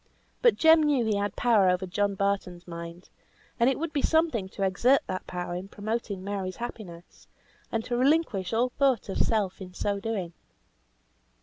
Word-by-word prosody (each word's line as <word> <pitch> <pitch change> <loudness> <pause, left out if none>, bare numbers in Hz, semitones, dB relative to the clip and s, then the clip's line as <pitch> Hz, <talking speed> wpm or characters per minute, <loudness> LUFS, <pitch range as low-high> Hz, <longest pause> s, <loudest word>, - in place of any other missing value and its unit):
But 475 -3 +5
Jem 320 0 +6
knew 290 -6 +2
he 215 -2 +1
had 205 -1 -2
power 215 -6 +4
over 180 +1 0
John 200 +2 -1
Barton's 195 -3 -2
mind; 170 +1 -8 0.5
and 235 +2 +5
it 270 - 0
would 330 0 -4
be 285 - 0
something 315 - +1
to 195 - -4
exert 235 +8 +3
that 185 0 -5
power 175 -1 -4
in 180 +2 -5
promoting 205 -2 -4
Mary's 195 -2 -4
happiness, 185 -8 -9 0.4
and 225 0 -2
to 245 - -2
relinquish 255 - +1
all 235 +3 +2
thought 260 -5 +1
of 195 - -3
self 205 -4 0
in 185 -1 -9
so 200 -1 -1
doing. 195 -5 -3
205 Hz, 175 wpm, -27 LUFS, 185-245 Hz, 0.5 s, Jem